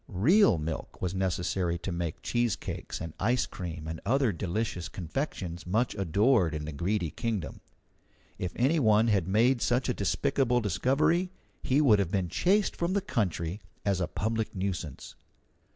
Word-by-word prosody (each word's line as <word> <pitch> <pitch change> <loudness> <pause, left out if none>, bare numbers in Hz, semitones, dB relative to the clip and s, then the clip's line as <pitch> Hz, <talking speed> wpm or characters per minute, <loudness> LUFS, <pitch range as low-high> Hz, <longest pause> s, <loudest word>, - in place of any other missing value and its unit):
Real 135 - +4
milk 80 -1 -5
was 90 -1 -2
necessary 90 -2 -1
to 90 +2 -5
make 85 -2 -4
cheesecakes 120 -7 -2
and 80 -2 -6
ice 125 +5 +2
cream 85 -3 -6
and 80 0 -5
other 130 +1 +2
delicious 90 0 -3
confections 90 - -4
much 110 +6 +1
adored 100 - +2
in 75 0 -4
the 80 - -5
Greedy 85 +2 -1
Kingdom. 100 - -3 0.8
If 90 - -2
any 140 +7 +2
one 110 -2 +4
had 95 -5 +2
made 115 +5 +3
such 125 +2 +1
a - - +2
despicable 125 -3 +1
discovery, 135 - +1 0.3
he 135 +3 +2
would 115 -8 +5
have 95 -4 0
been 95 -2 -1
chased 200 - +2
from 170 +2 -1
the 200 - +1
country 95 - -2 0.2
as 100 -2 +1
a 90 - 0
public 110 +1 -2
nuisance. 90 -7 -4
100 Hz, 155 wpm, -29 LUFS, 85-120 Hz, 0.8 s, would